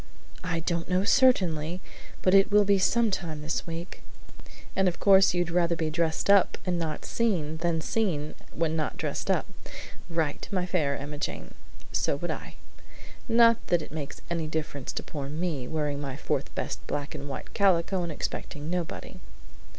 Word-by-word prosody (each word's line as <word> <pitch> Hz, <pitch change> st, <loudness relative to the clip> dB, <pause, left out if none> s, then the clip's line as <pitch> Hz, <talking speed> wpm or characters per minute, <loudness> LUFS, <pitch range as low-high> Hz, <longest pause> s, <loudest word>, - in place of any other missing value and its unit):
"I 165 Hz, -2 st, -1 dB
don't 170 Hz, +1 st, -2 dB
know 185 Hz, +1 st, +2 dB
certainly, 185 Hz, -, +3 dB, 0.4 s
but 185 Hz, -, +4 dB
it 195 Hz, +1 st, +6 dB
will 210 Hz, 0 st, +6 dB
be 200 Hz, -1 st, +3 dB
some 230 Hz, +3 st, +3 dB
time 160 Hz, -6 st, -3 dB
this 155 Hz, +3 st, -2 dB
week." 165 Hz, -, -6 dB, 0.7 s
"And 190 Hz, 0 st, +3 dB
of 175 Hz, -, -1 dB
course 190 Hz, -2 st, +6 dB
you'd 175 Hz, -1 st, 0 dB
rather 170 Hz, -1 st, +2 dB
be 160 Hz, -1 st, -1 dB
dressed 160 Hz, 0 st, 0 dB
up 200 Hz, -2 st, +5 dB
and 180 Hz, -2 st, 0 dB
not 155 Hz, -2 st, -3 dB
seen, 170 Hz, -10 st, 0 dB
than 165 Hz, 0 st, 0 dB
seen 155 Hz, -6 st, -1 dB, 0.2 s
when 160 Hz, -1 st, 0 dB
not 155 Hz, -2 st, -2 dB
dressed -, -, -3 dB
up. -, -, +2 dB, 0.6 s
Right, 160 Hz, -3 st, -1 dB
my 185 Hz, -2 st, 0 dB
Fair 155 Hz, -6 st, 0 dB
Emmajane; 145 Hz, +1 st, -5 dB, 0.4 s
so -, -, +1 dB
would -, -, -3 dB
I. -, -, -6 dB, 0.7 s
Not 230 Hz, 0 st, +6 dB
that 175 Hz, -2 st, +2 dB
it -, -, -11 dB
makes 150 Hz, -2 st, -6 dB
any 165 Hz, -2 st, -2 dB
difference 155 Hz, -4 st, -3 dB
to -, -, -3 dB
poor 140 Hz, -3 st, -5 dB
me, 155 Hz, -4 st, -2 dB
wearing 150 Hz, -2 st, -1 dB
my 135 Hz, -2 st, -4 dB
fourth 145 Hz, -3 st, -2 dB
best -, -, -3 dB
black 145 Hz, 0 st, -3 dB
and 145 Hz, -2 st, -6 dB
white 135 Hz, -, -7 dB
calico 190 Hz, -1 st, +3 dB
and 170 Hz, -2 st, -3 dB
expecting 150 Hz, +1 st, -4 dB
nobody. 180 Hz, -2 st, -4 dB
170 Hz, 170 wpm, -28 LUFS, 150-185 Hz, 0.7 s, it